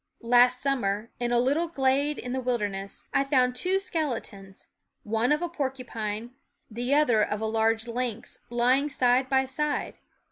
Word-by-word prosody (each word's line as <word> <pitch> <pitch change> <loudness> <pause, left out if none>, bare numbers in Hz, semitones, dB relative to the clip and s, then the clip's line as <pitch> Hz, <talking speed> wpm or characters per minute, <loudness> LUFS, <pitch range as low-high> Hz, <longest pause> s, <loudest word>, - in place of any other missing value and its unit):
Last 245 +1 +5
summer, 230 -6 -1
in 240 0 -1
a 240 - +3
little 285 +8 +2
glade 280 -1 +1
in 250 0 -5
the 260 - -1
wilderness, 205 -6 -3
I 275 - +3
found 255 -3 +2
two 365 +9 +1
skeletons, 235 - -4 0.4
one 225 +4 0
of 300 +3 +2
a - - 0
porcupine, 245 -7 -4 0.4
the 245 +5 0
other 245 -8 +4
of 210 0 -2
a 220 - -2
large 225 +1 +1
lynx, 235 -1 -4
lying 250 +4 +2
side 255 -1 +2
by 265 0 +3
side. 290 +3 -2
250 Hz, 155 wpm, -27 LUFS, 225-275 Hz, 0.4 s, Last